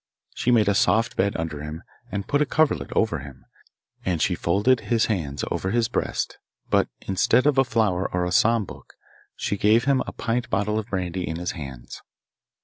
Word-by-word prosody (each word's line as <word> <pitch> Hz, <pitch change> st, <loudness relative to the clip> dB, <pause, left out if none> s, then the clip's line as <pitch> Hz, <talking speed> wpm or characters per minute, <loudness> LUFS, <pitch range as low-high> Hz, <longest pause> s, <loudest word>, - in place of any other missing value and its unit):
She -, -, -1 dB
made 115 Hz, -4 st, +4 dB
a 100 Hz, -, +4 dB
soft 115 Hz, +3 st, +2 dB
bed 100 Hz, +1 st, +1 dB
under 80 Hz, -2 st, -4 dB
him, 75 Hz, +2 st, -7 dB, 0.3 s
and 100 Hz, 0 st, -3 dB
put 145 Hz, +1 st, +1 dB
a -, -, +4 dB
coverlet 155 Hz, -1 st, +1 dB
over 110 Hz, -8 st, +1 dB
him, 65 Hz, -1 st, -12 dB, 0.6 s
and 90 Hz, -3 st, 0 dB
she 90 Hz, -, +2 dB
folded 105 Hz, +9 st, +2 dB
his 115 Hz, -2 st, +3 dB
hands 80 Hz, -10 st, -2 dB
over 95 Hz, -, -1 dB
his 115 Hz, +2 st, +1 dB
breast; 120 Hz, -, -2 dB, 0.3 s
but -, -, +3 dB
instead 115 Hz, +6 st, +2 dB
of 145 Hz, -2 st, +4 dB
a -, -, +6 dB
flower 110 Hz, -7 st, 0 dB
or 90 Hz, -1 st, 0 dB
a 90 Hz, -, -2 dB
psalm 115 Hz, +1 st, +3 dB
book, -, -, -12 dB, 0.4 s
she 100 Hz, -, -2 dB
gave 110 Hz, +4 st, +4 dB
him 135 Hz, 0 st, +2 dB
a -, -, -4 dB
pint 120 Hz, +2 st, -2 dB
bottle 105 Hz, +2 st, 0 dB
of 110 Hz, -, -6 dB
brandy 90 Hz, -4 st, -3 dB
in 80 Hz, -, -3 dB
his 85 Hz, +1 st, -3 dB
hands. 70 Hz, -7 st, -9 dB
100 Hz, 195 wpm, -24 LUFS, 90-115 Hz, 0.6 s, a